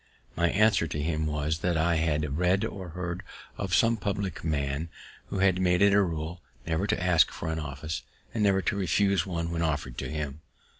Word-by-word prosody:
My 85 +1 +2
answer 100 -4 +3
to 75 - -4
him 80 0 -1
was, 75 +1 -1
that 85 0 0
I 80 +1 +2
had 75 -3 0
read 95 +4 +3
or 95 -5 -6
heard 90 +1 -4 0.3
of 95 -2 -1
some 115 -1 +4
public 100 -2 -3
man 75 0 -1 0.4
who - - -4 0.2
made 90 0 +3
it 100 0 +6
a 100 - +6
rule 85 -1 -3 0.2
never 80 +5 0
to - - +1
ask 90 -3 +5
for 80 - -4
an 80 - -2
office, 75 +1 -4 0.3
and 110 - -1
never 95 -2 +3
to 100 - 0
refuse 100 +1 +2
one 85 -2 -2
when 85 -1 -1
offer'd 70 -6 -1
to - - -4
him. 75 -1 -4
85 Hz, 195 wpm, -28 LUFS, 80-95 Hz, 0.4 s, it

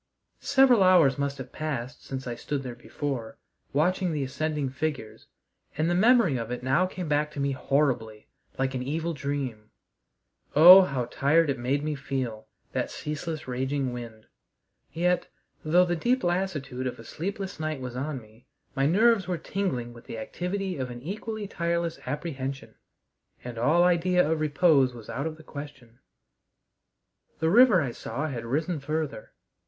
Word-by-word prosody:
Several 265 -5 +5
hours 170 -8 +5
must 140 0 -1
have 130 -1 -8
passed 140 -4 -4
since 130 -1 -6
I 120 - -3
stood 135 +4 -4
there 125 -2 -5
before, 125 0 -5 0.3
watching 180 +5 +1
the 150 -3 -1
ascending 145 +1 -2
figures, 135 -5 -4 0.5
and 155 +2 +1
the 175 - +2
memory 210 - +4
of 115 -1 -4
it 125 0 -5
now 140 +8 +2
came 185 -2 -6
back 150 0 +1
to 145 - -6
me 140 0 +1
horribly, 130 -6 0 0.3
like 135 0 0
an 130 - -2
evil 160 +6 -2
dream. 135 -7 -4 0.9
Oh, 180 +6 +11
how 135 -9 -1
tired 145 +5 +2
it 135 - -4
made 135 +4 0
me 155 0 -1
feel, 130 -6 -4 0.2
that - - -2
ceaseless 150 0 -5
raging 130 +1 -1
wind! 115 -3 -8 0.7
Yet, 175 +3 +1 0.4
though 175 +4 +4
the 175 -1 0
deep 245 +9 +1
lassitude 170 -8 -1
of 125 - -4
a 115 - -11
sleepless 190 - -5
night 155 -2 -2
was 125 -1 -6
on 135 +1 -3
me, 110 +3 -20 0.3
my 135 +1 +2
nerves 205 +3 +4
were 180 -2 -1
tingling 130 -13 -3
with 120 - -14
the - - -7
activity 180 - -3
of 130 -2 -3
an 120 0 -8
equally 210 +4 -5
tireless 170 -3 -2
apprehension, 135 -2 -4 0.7
and 120 -2 -6
all 160 +8 +4
idea 180 0 +3
of 160 0 0
repose 145 -4 +3
was 115 -2 -9
out 140 +4 -2
of 155 -1 -6
the 160 - -14
question. 140 -6 -10 1.4
The 160 0 +1
river 225 -4 +7
I 125 - -3
saw 140 +5 -4
had 120 -5 -5
risen 155 +6 -1
further. 150 -4 -4
145 Hz, 165 wpm, -27 LUFS, 130-170 Hz, 1.4 s, Oh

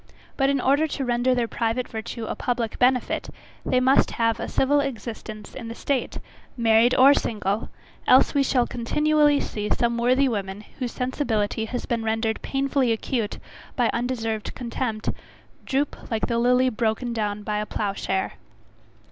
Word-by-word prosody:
But 270 -1 +2
in 280 -1 +2
order 280 +5 +3
to 275 -2 -3
render 245 +1 +2
their 240 -2 0
private 230 +2 -1
virtue 225 +1 -6
a - - -3
public 240 -3 -2
benefit, 250 -1 +1 0.3
they 255 - +2
must 260 +2 +4
have 230 -1 +1
a - - -3
civil 285 +2 +2
existence 225 -5 -5
in 235 -4 -7
the 230 - -6
state, 270 0 -2 0.4
married 230 +1 +4
or 270 +2 +8
single; 210 -5 -1 0.4
else 255 - +6
we 285 - +3
shall 255 -2 +2
continually 295 +4 +2
see 210 -1 -4
some 235 0 +1
worthy 255 +3 +3
woman, 200 -4 -3 0.2
whose 250 -3 -2
sensibility 225 -5 -1
has 245 +2 -4
been 230 -2 -1
rendered 225 0 -1
painfully 270 -2 0
acute 225 -1 -2 0.4
by 245 -4 +2
undeserved 230 -3 -2
contempt, 235 -3 -3 0.6
droop 275 +1 -2
like 225 -2 0
"the 235 0 0
lily 250 +2 +4
broken 230 +1 -1
down 210 -2 -2
by 210 0 -1
a 210 - -3
plough 205 -2 -2
share." 190 -1 -2
240 Hz, 160 wpm, -24 LUFS, 220-260 Hz, 0.6 s, or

